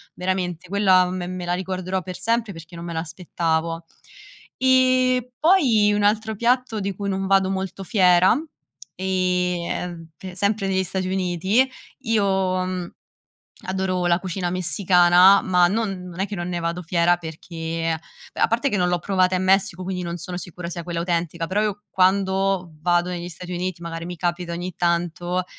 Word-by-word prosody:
veramente 180 -2 -2
quella 190 -2 +4
me 180 -1 -4
me 185 0 -5
la 175 - -1
ricorderò 185 0 -3
per 185 0 -7
sempre 230 -2 0
perché 165 +1 -12
non 170 - -7
me 170 - -5
l'aspettavo. 165 0 -2 0.8
E 255 -1 +3
poi 255 - +4
un 205 0 +1
altro 220 +1 +1
piatto 235 0 +1
di 200 0 -2
cui 200 +2 -5
non 195 0 -2
vado 195 -1 +3
molto 190 0 -4
fiera, 185 -3 +5 0.6
ehm, 180 -2 -1
mpe 180 +3 -10
sempre 200 0 0
negli 190 0 +1
Stati 185 0 -3
Uniti, 190 +5 +1 0.3
io, 225 -5 +1 0.4
mh, 180 -1 -4 0.7
adoro 185 -1 -1
la 170 0 +3
cucina 185 -1 -3
messicana, 180 +1 +5
ma 180 -1 +4
non 195 -2 -2
non 175 +1 -8
è 195 - +1
che 205 - -6
non 175 -1 -4
ne 175 -1 -2
vado 170 +1 -2
fiera 170 +1 +2
perché, 165 0 -4 0.4
a - - +2
parte 235 +5 +1
che 205 - 0
non 180 -1 +2
l'ho 175 0 +1
provata 185 0 +1
in 185 - 0
Messico, 190 -1 +2
quindi 185 -1 -3
non 170 0 -4
sono 175 +1 -6
sicura 180 -1 -7
sia 170 0 -5
quella 170 -1 -3
autentica, 170 -1 -1
però 190 +4 0
io 205 -1 -2
quando 190 -1 +1
vado 175 +1 +1
negli 175 -1 -5
Stati 180 +1 -8
Uniti, 180 -1 -3
magari 165 0 -5
mi 175 0 -6
capita 175 0 -2
ogni 175 +1 -5
tanto, 175 +1 -1
185 Hz, 170 wpm, -23 LUFS, 175-195 Hz, 0.8 s, fiera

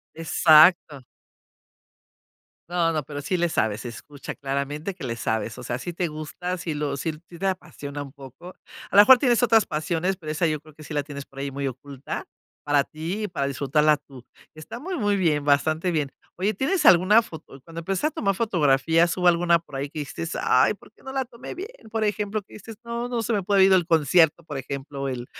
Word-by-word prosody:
Exacto. 160 -2 +5 1.7
No, 170 -2 +1
no, 155 - -1
pero 145 +1 -7
sí 180 +4 -1
le 175 0 +2
sabes, 110 -9 0
se 120 - -6
escucha 145 +4 -9
claramente 140 +6 -3
que 180 - -12
le 115 -3 -3
sabes, 110 0 -2
o - - -9
sea, 120 - -3
sí 175 +6 -6
te 175 -1 -1
gusta, 155 +4 -5
sí 165 -3 -4
lo 145 -2 -2
sí 160 +1 -2
te 175 +3 -7
apasiona 145 -6 -4
un 140 -2 -10
poco. 140 +6 -12 0.4
A - - -1
la 205 - +11
mejor 260 +5 +9
tienes 245 -2 +2
otras 225 -3 +5
pasiones, 165 +4 -1
pero 155 -3 -7
esa 165 +2 +1
yo 155 -2 -1
creo 155 -1 -18
que 155 -1 -13
sí 150 - -8
la 145 - 0
tienes 140 -1 -8
por 135 - -17
ahí 140 0 -3
muy 140 0 -4
oculta, 135 +1 -6 0.4
para 145 -1 +2
ti 170 +7 -5
y 210 - -2
para 140 -6 -2
disfrutarla 145 +2 +2
tú. 135 -4 -15 0.3
Está 155 +9 -9
muy 360 +5 -5
muy 205 -2 +1
bien 155 -6 +1
bastante 155 +5 +2
bien. 150 -5 -1 0.2
Oye, 195 +4 0
¿tienes 280 - 0
alguna 185 +6 +6
foto? 160 -8 -12
Cuando 165 +2 -10
empezaste 195 - -1
a - - -8
tomar 200 - -1
fotografías 165 - +2
hubo 180 - 0
alguna 170 -1 +4
por 155 -4 -11
ahí 140 +1 -3
que 150 - -6
dijiste: 150 +3 -5
"Ay, 130 +10 +3
¿por 210 - -19
qué - - -25
no 265 - -8
la 265 -1 -1
tomé 235 +5 -10
bien?" 390 +6 -7 0.2
Por 220 0 -1
ejemplo, 210 0 -1
que - - -24
dices: 215 +1 -10
"No, 235 +1 -4
no 235 -2 -2
se 230 - -2
me 205 -3 0
puede 195 0 +4
ir 195 - +5
del 180 -3 +4
concierto", 165 0 +3
por 145 -4 -6
ejemplo, 140 +1 -5
el 125 -2 -5
165 Hz, 215 wpm, -24 LUFS, 145-195 Hz, 1.7 s, la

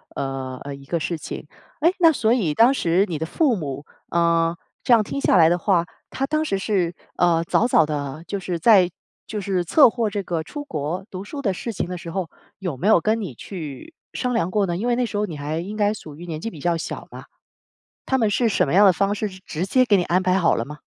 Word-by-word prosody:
呃 130 -1 -4
呃， 140 0 -6
一 140 0 -14
个 170 +4 -1
事 165 +1 -2
情。 150 - -7 0.3
诶， 340 +4 +4
那 330 -2 +7
所 230 -4 +1
以 190 -12 +1
当 235 - +5
时 180 -5 +2
你 160 - -2
的 160 - -3
父 260 - +1
母 145 -4 -5 0.2
啊， 170 0 +2 0.3
这 245 - +4
样 225 - +5
听 275 - -4
下 - - +3
来 165 -3 +6
的 175 - +2
话， 180 -2 +2 0.3
他 270 - -1
当 310 +1 0
时 195 - 0
是， 180 -3 0 0.2
呃， 170 -1 +3
早 230 +7 +2
早 160 - +4
地 145 0 -4
就 200 - -3
是 180 -2 -3
在 185 -1 +6 0.4
就 210 -1 -4
是 185 -2 -1
策划 235 - +4
这 205 - -2
个 170 -3 -2
出 290 - -7
国 165 - -4
读 185 -2 -6
书 280 +8 -7
的 205 - +1
事 225 +5 -5
情 185 - -3
的 180 - -4
时 170 -1 -8
候， 185 -3 -3 0.3
有 180 -8 -4
没 185 - -1
有 215 -6 +5
跟 220 +4 +1
你 190 - -5
去 160 - -8 0.2
商 250 -1 -1
量 185 -5 0
过 200 -1 +1
呢？ 175 - -2
因 210 - -3
为 240 - +2
那 250 - +1
时 210 - -4
候 210 - +1
你 170 - -7
还 150 +2 -4
应 195 +5 -5
该 210 0 +2
属 155 -7 -10
于 170 +4 -10
年 160 -2 -4
纪 225 - -4
比 160 - -11
较 170 +3 0
小 165 - -6
嘛。 - - -10 0.8
他 265 - +1
们 220 -4 +2
是 230 +3 +2
什 175 - +1
么 - - -1
样 200 +3 +7
的 195 - +8
方 200 +4 0
式， 210 0 -2
直 185 -1 -12
直 165 +3 -3
接 255 +6 +3
给 210 - +4
你 185 - +2
安 175 +2 +1
排 185 0 +2
好 170 -3 +3
了 115 - -2
吗？ 150 +2 -10
185 Hz, 280 characters per minute, -22 LUFS, 165-215 Hz, 0.8 s, 的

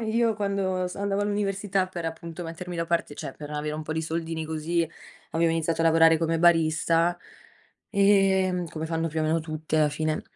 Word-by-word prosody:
io 225 0 +1
quando 195 -3 -1
s 180 - -6
andavo 200 0 -1
all'università 200 -2 0
per 175 -2 -6
appunto 165 +1 -6
mettermi 175 +2 -6
da 165 0 -1
parte 170 -3 -1
cioè 135 - -6
per 150 -1 -8
avere 150 0 -3
un 155 - -4
po' 155 - -4
di 160 - -1
soldini 160 0 -3
così, 160 +1 -1 0.4
avevo 165 0 +2
iniziato 165 0 0
a - - +2
lavorare 165 0 +6
come 165 0 0
barista. 165 0 +3 0.7
Ehm, 190 -3 +3
come 160 0 -5
fanno 165 0 -1
più 160 0 -2
o - - +1
meno 160 +1 +1
tutti, 155 0 -3
alla 155 -1 +4
fine. 155 +1 -1
165 Hz, 190 wpm, -26 LUFS, 160-185 Hz, 0.7 s, lavorare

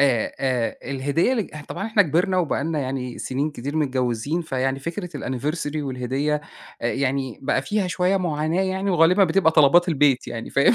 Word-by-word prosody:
آآ 130 -6 +2
آآ 125 -4 0
الهدية 140 - +1
اللي 235 -4 +1
ج 150 -5 -10
طبعًا 200 - -4
إحنا 220 -2 +4
كبرنا 180 +3 +1
وبقى 160 -5 0
لنا 160 -1 -1
يعني 130 -2 -4
سِنين 140 +4 -2
كتير 140 +1 -5
من 150 -2 +2
متجوِّزين، 130 +4 -1
فيعني 135 -3 -1
فكرة 170 +5 -5
الAnniversary 145 +4 -3
والهدية، 140 +1 -1 0.4
آآ 115 - +1
يعني 135 -2 -1
بقى 135 0 +1
فيها 205 +5 -1
شوية 180 +3 +1
معاناة 165 -1 0
يعني 190 +1 -1
وغالبًا 180 +3 +5
بتبقى 160 -1 +3
طلبات 160 +4 +5
البيت 145 -5 +2
يعني، 115 -1 -6
فاهم، 130 -3 +4
150 Hz, 180 wpm, -23 LUFS, 130-175 Hz, 0.4 s, وغالبًا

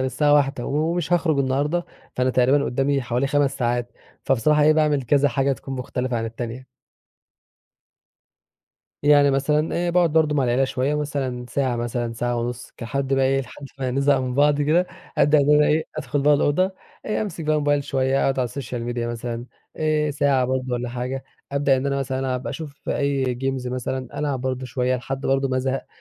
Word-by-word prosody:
الساعة 145 +3 +2
01:00، 140 -3 +1
ومش 165 +3 -1
هاخرج 160 -4 +2
النهارده، 145 +6 0 0.3
فأنا 130 0 +2
تقريبًا 130 +3 +3
قدّامي 135 +1 0
حوالي 120 +3 0
5 140 -1 +1
ساعات، 120 -1 -1 0.3
فبصراحة 145 +4 +3
إيه 155 +1 +6
باعمل 150 -3 +2
كذا 140 +3 +3
حاجة 135 0 +1
تكون 135 0 -6
مختلفة 125 -1 -3
عن 115 - -2
التانية. 120 +3 -6 2.4
يعني 145 -1 +5
مثلًا 150 +3 +1
آآ، - - +1
باقعد 175 -3 +3
برضو 155 -2 +3
مع 140 - +2
العيلة 125 +2 +2
شويّة، 130 +2 -1
مثلًا 135 -4 -3
ساعة 130 -3 0
مثلًا 120 0 -2
ساعة 120 +1 -2
ونُص 120 +1 -4
كحد 135 +3 -2
بقى 135 0 +2
إيه 135 +1 +2
لحد 140 +2 -10
ما 130 -1 -1
نزهق 140 +1 +2
من 125 -1 -3
بعض 145 +1 +3
كده، 170 +5 +3 0.3
أبدأ 150 +2 +5
إن 145 +1 +4
أنا 150 0 +5
إيه 155 +1 +2
أدخل 140 +2 -2
بقى 145 0 +5
الأوضة، 185 +7 +1 0.3
آآ، 215 - 0
أمسك 170 -6 -5
بقى 155 0 +2
الموبايل 145 -1 +1
شويّة، 135 0 +1
أقعد 135 -1 +1
على 125 -2 +1
الsocial 120 -2 -5
media 120 - -4
مثلًا 120 +1 -5 0.3
آآ، 155 -1 +1
ساعة 140 -2 +2
برضو 130 0 -2
والّا 120 0 -2
حاجة، 125 +2 -4 0.3
أبدأ 140 -1 +3
إن 130 +2 -2
أنا 140 0 0
مثلًا 130 -1 -2
ألعب، 130 -1 -2
أشوف 150 -3 -7
أي 135 -3 0
games 135 -1 -1
مثلًا 130 +2 -4
ألعب 145 -4 -1
برضو 130 0 -3
شويّة 125 +1 0
لحد 135 +2 -5
برضو 135 0 +1
ما 130 - 0
ازهق، 130 +1 -2
135 Hz, 185 wpm, -23 LUFS, 125-145 Hz, 2.4 s, إيه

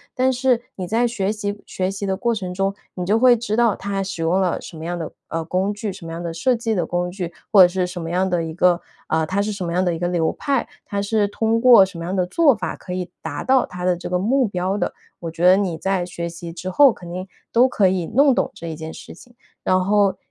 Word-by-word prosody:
但 260 0 +2
是 250 -1 +1
你 185 -2 -5
在 230 +5 +2
学 205 -4 -1
习 205 -1 -4
学 185 0 -2
习 195 +1 -5
的 190 0 -1
过 235 +3 0
程 185 -4 -4
中， 195 +1 0 0.2
你 180 - -3
就 205 +4 +3
会 245 0 +6
知 220 -2 -2
道 230 -3 +3
它 200 0 -3
使 190 -4 -4
用 180 +4 +2
了 180 -2 0
什 - - -10
么 155 - -8
样 175 +1 -3
的， 165 -2 -5 0.2
呃， 165 0 -2
工 185 +4 0
具， 210 -1 -4
什 190 -1 -12
么 - - -6
样 165 +1 -5
的 170 -1 -4
设 245 +10 +1
计 230 -1 -1
的 175 -6 -1
工 175 0 -1
具， 180 -2 -5 0.2
或 205 -3 +8
者 180 - +9
是 180 +1 -1
什 180 0 -6
么 165 - -5
样 185 +2 +1
的 175 -2 0
一 160 - -4
个， 175 0 +3 0.2
啊 160 0 0
它 200 +4 0
是 215 - -2
什 200 -3 -5
么 170 - -3
样 180 +1 +1
的 175 - +1
一 165 - -4
个 175 - 0
流 170 -2 +1
派， 275 -4 -1 0.2
它 200 - -2
是 205 +1 +1
通 225 +2 0
过 240 -6 +8
什 190 -3 -9
么 - - -5
样 180 +3 -3
的 185 -2 +1
做 280 - +4
法 - - -4
可 180 - -8
以 180 -1 -4
达 160 -3 -5
到 260 -1 +4
它 180 0 -6
的 180 -1 +3
这 175 - -7
个 180 - +1
目 245 +7 +2
标 185 0 -2
的。 205 - -1 0.3
我 170 - -5
觉 165 +2 -2
得 185 +1 +8
你 190 -4 -1
在 190 +1 0
学 170 -1 -5
习 170 0 -8
之 180 +2 -6
后， 280 +6 +6
肯 175 -5 -10
定 185 +1 -5 0.2
都 245 +3 +5
可 200 -6 +3
以 180 -3 0
弄 280 +1 +4
懂 - - 0
这 170 - -9
一 160 - -4
件 160 0 -7
事 - - -11
情。 240 +8 -17 0.3
然 185 0 +2
后 200 -1 +3
190 Hz, 300 characters per minute, -21 LUFS, 175-215 Hz, 0.3 s, 者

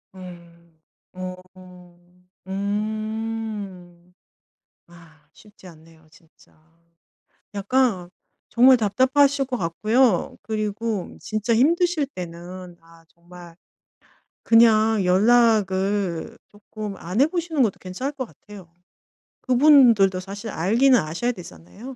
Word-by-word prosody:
음 170 -2 -14 0.4
어 185 0 -6 1.1
음. 205 -3 -5 0.7
아 165 -3 -20
쉽지 210 -2 -20
않네요, 160 -1 -18
진짜. 160 +1 -24 1.0
약간 200 -3 0 0.4
정말 255 +3 +5
답답하실 265 +6 +2
것 255 -1 -3
같고요. 215 +4 0
그리고 215 -1 -4
진짜 215 +2 -2
힘드실 330 +4 +2
때는 180 -4 -10
아 165 0 -21
정말 170 0 -16 0.9
그냥 225 -2 +4
연락을 195 -3 +1
쪼끔 210 0 -8
안 185 +8 -2
해 - - +6
보시는 325 -5 -1
것도 210 - -2
괜찮을 255 +11 -5
것 265 -2 -5
같아요. 200 -6 -15 0.7
그분들도 245 -8 +4
사실 200 +4 -8
알기는 235 +9 +3
아셔야 170 +11 -2
되잖아요. 180 - -12
205 Hz, 200 characters per minute, -22 LUFS, 180-235 Hz, 1.1 s, 해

